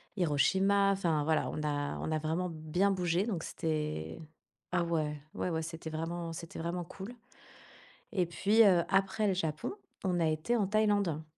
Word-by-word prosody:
Hiroshima, 190 +4 +3
enfin, 165 -6 +1
voilà, 155 +1 +1
on 150 - -4
a 145 -1 -1
on - - -3
a 155 - +1
vraiment 165 +4 -1
bien 160 +6 +1
bougé 180 0 +1
donc 190 -8 -2
c'était 150 - -3 0.5
ah 175 -1 +2
ouais. 155 -3 -1
Ouais, - - -2
ouais, 160 -1 -1
c'était 165 0 -6
vraiment 165 +1 -3
c'était 165 0 -7
vraiment 170 +2 -2
cool 195 +7 -9 1.0
et 185 -5 +1
puis, 205 +6 +4
heu, 180 -4 +5
après 195 +2 +2
le 195 - +3
Japon, 160 - -2 0.3
on 180 -2 +1
a 165 - +3
été 155 +10 +1
en 205 -4 +1
Thaïlande 205 -7 +2
170 Hz, 170 wpm, -32 LUFS, 155-195 Hz, 1.0 s, heu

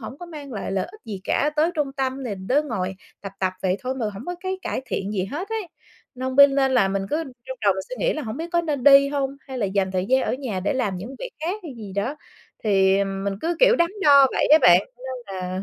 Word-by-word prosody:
hổng 260 +4 -8
có 350 - -8
mang 295 -5 -9
lại 200 -2 -4
lợi 190 -1 -1
ích 425 +4 -15
gì 205 -5 -6
cả, 295 - +1
tới 320 +3 +3
trung 290 -3 -1
tâm 270 -1 -2
thì 210 - -3
đứa 250 +11 0
ngồi 190 -9 -3 0.3
tập 195 -1 -7
tập 185 -1 +1
vậy 185 0 +1
thôi 260 +1 -3
mà 235 -4 -2
hổng 195 - -8
có 355 - -3
cái 375 0 -3
cải - - -3
thiện 195 +2 -3
gì 190 -3 -1
hết 325 - -5
ấy, 440 -5 -3 0.5
nên 260 +1 -4
bên 280 -1 +8
nên 270 -1 +2
là 230 -7 +4
mình 195 0 -2
cứ 300 - +1 0.3
trong 260 0 -6
đầu 200 - +5
mình 190 0 -4
suy 255 - -5
nghĩ - - +1
là 310 - -4
hổng 220 -3 -5
biết 330 +2 -5
có 345 - +3
nên 295 -6 -3
đi 280 0 +8
hông, 280 -1 -2
hay 265 -1 -7
là 210 - 0
dành 190 -1 0
thời 185 0 -1
gian 260 +2 +3
ở - - -1
nhà 240 -9 -4
để 200 - 0
làm 235 -8 -1
những 220 +9 -7
việc - - -6
khác 360 +7 -3
hay 315 - -7
gì 210 -4 -8
đó, 220 +10 -2 0.5
thì 195 -1 +3
mình 195 0 -3
cứ, 335 +1 -1
kiểu, - - +6
đắn 340 0 +3
đo 280 -3 +7
vậy - - +1
á 310 - +9
bạn, 175 +1 +7 0.2
nên 250 -6 -7
là 185 +1 -3
260 Hz, 275 wpm, -23 LUFS, 195-290 Hz, 0.5 s, á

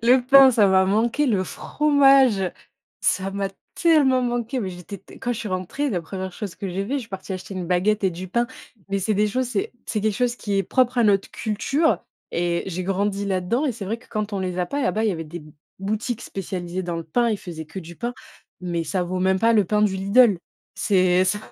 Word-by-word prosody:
le 250 +2 +6
pain, 270 0 +8
ça 210 -4 +4
m'a 190 0 +4
manqué. 230 +9 +1
Le 205 -7 +2
fromage, 275 -3 +3 0.6
ça 195 0 0
m'a 195 0 -2 0.3
tellement 285 -7 +4
manqué, 240 +1 -1
mais 190 -4 -3
j'étais 180 +3 -9
t - - -16
quand 245 - -2
je 235 - -5
suis 225 - -4
rentrée, 185 +10 -2
la 180 -6 -1
1re 185 +3 -6
chose 200 -1 -6
que 195 - -5
j'ai 190 +2 -3
fais, 270 - -2
je - - +1
suis 230 - -10
partie 190 -1 -6
acheter 190 +1 -6
une 185 -2 -4
baguette 190 +4 +1
et 190 - +3
du 180 +2 -7
pain, 235 +6 +1 0.4
mais 195 0 0
c'est 215 +3 0
des 210 +2 +2
choses 255 +5 -1
c'est 215 -5 -2
c'est 215 - -2
quelque 215 0 0
chose 245 +2 0
qui 205 -2 -2
est 195 - +2
propre 255 +5 +1
à 235 - +4
notre 200 -2 +2
culture 275 +9 0 0.3
et 170 0 0
j'ai 185 -1 -4
grandi 200 +1 -1
là-dedans, 195 +9 0
et 265 - 0
c'est 210 -3 -7
vrai 225 +4 -3
que, 245 - -21
quand 215 -1 -3
on 200 - -1
les 185 -1 -3
a 180 - 0
pas, 285 +10 -3
là-bas, 215 +1 0
il - - +3
y - - +1
avait 165 -2 -5
des 170 +3 -8
b 155 0 -15 0.3
boutiques 215 +4 -3
spécialisées 185 -1 -5
dans 175 -1 -3
le 165 - -5
pain, 235 +10 +1
ils 220 - 0
faisaient 160 -3 -8
que 175 - -8
du 170 0 -11
pain, 240 +1 -4 0.5
mais 175 -2 -2
ça 185 0 -1
vaut 185 +1 -3
même 190 0 +2
pas 230 +2 +4
le 210 -3 +4
pain 210 +3 +1
du 200 -2 +2
Lidl. 200 +1 +4 0.4
C'est 185 -2 +3
ça 205 +2 0
200 Hz, 245 wpm, -23 LUFS, 185-235 Hz, 0.6 s, pain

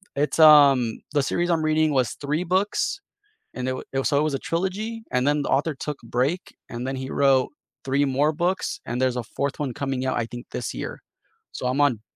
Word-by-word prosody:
it's, 145 +3 -1
um 140 -7 +7
the 145 - +3
series 175 +5 -1
I'm 165 -2 +1
reading 155 0 +2
was 130 -5 +1
3 150 +5 -1
books 200 - 0 0.5
and 125 0 -3
it - - -1
wa - - -7 0.2
so 145 - +1
it - - +2
was 155 -2 -1
a 135 - -1
trilogy, 205 +6 -2
and 125 +2 +1
then 145 0 +2
the - - -4
author 150 +2 -2
took 145 +2 -5
break, 130 +10 0 0.3
and 120 +2 -5
then 135 - -2
he 130 0 -5
wrote 135 -2 +3 0.4
3 140 +1 +2
more 140 +3 +2
books, 180 +4 -1
and 120 +1 -2
there's 130 -1 +1
a 125 - -2
4th 140 0 -2
one 140 -4 -2
coming 135 -2 -2
out, 130 - 0
I 120 - 0
think, 120 +1 -9
this 120 - -4
year. - - -6 0.5
So, 125 - -4
I'm 130 +3 0
on 130 -7 +2
140 Hz, 215 wpm, -24 LUFS, 130-155 Hz, 0.5 s, um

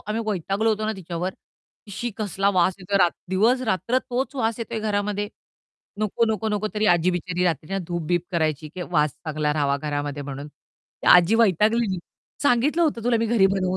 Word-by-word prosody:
आम्ही 220 +2 -2
वैतागलो 200 +2 0
होतो 215 0 -1
ना 220 - 0
तिच्यावर, 175 0 -4 0.6
की 205 - -12
"शी 240 +5 -3
कसला 200 -2 0
वास 180 +1 +3
येतोय" 195 +2 0
रा 175 - +5 0.2
दिवस-रात्र 230 +3 +2
तोच 260 +4 -1
वास 225 -2 0
येतोय 230 -1 -4
घरामध्ये. 205 -1 -1 0.7
"नको, 215 +2 +1
नको, 220 +1 -2
नको." 210 0 -1
तरी 215 0 +1
आजी 175 +1 +2
बिचारी 180 0 -2
रात्रीच्या 175 +3 -1
धूप-बीप 175 0 -1
करायची 155 -2 0
की 180 - -4
वास 150 -4 +2
चांगला 150 -1 -2
राहावा 140 -2 +1
घरामध्ये 145 -1 -3
म्हणून. 140 +1 -6
ती 145 - -17
आजी 180 +5 +4
वैतागलेली, 215 -1 +3 0.4
"सांगितलं 285 +6 +3
होतं 240 -8 0
तुला 245 -1 +3
मी 230 - +1
घरी 215 -4 +4
बनवू 185 0 0
195 Hz, 175 wpm, -24 LUFS, 170-220 Hz, 0.7 s, रा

